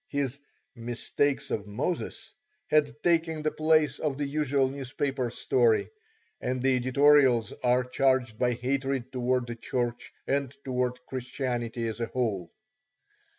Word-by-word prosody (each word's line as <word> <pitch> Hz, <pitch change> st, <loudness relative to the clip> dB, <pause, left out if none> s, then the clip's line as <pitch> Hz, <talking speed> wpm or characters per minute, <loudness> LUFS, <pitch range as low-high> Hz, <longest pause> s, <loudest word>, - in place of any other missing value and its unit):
His 140 Hz, -1 st, -2 dB, 0.4 s
"Mistakes 120 Hz, +4 st, -1 dB
of 105 Hz, -1 st, -2 dB
Moses" 175 Hz, -, -3 dB, 0.4 s
had 150 Hz, -1 st, +2 dB
taken 165 Hz, -2 st, +2 dB
the 155 Hz, -, +1 dB
place 155 Hz, -2 st, +2 dB
of 145 Hz, -3 st, -1 dB
the 145 Hz, -, -1 dB
usual 140 Hz, -2 st, +1 dB
newspaper 135 Hz, -1 st, -2 dB
story, 120 Hz, -1 st, +2 dB, 0.5 s
and 130 Hz, +1 st, -1 dB
the 130 Hz, +1 st, +3 dB
editorials 130 Hz, -3 st, +4 dB
are 125 Hz, +1 st, +3 dB
charged 125 Hz, -3 st, +1 dB
by 125 Hz, -1 st, +2 dB
hatred 130 Hz, +1 st, -2 dB
towards 125 Hz, -1 st, 0 dB
the 120 Hz, -1 st, -5 dB
Church 120 Hz, +1 st, -3 dB
and 140 Hz, -2 st, 0 dB
towards 125 Hz, -1 st, -1 dB
Christianity 125 Hz, -2 st, -3 dB
as 110 Hz, +1 st, -4 dB
a 115 Hz, -, -1 dB
whole. 105 Hz, -9 st, -2 dB
130 Hz, 130 wpm, -28 LUFS, 120-140 Hz, 0.5 s, editorials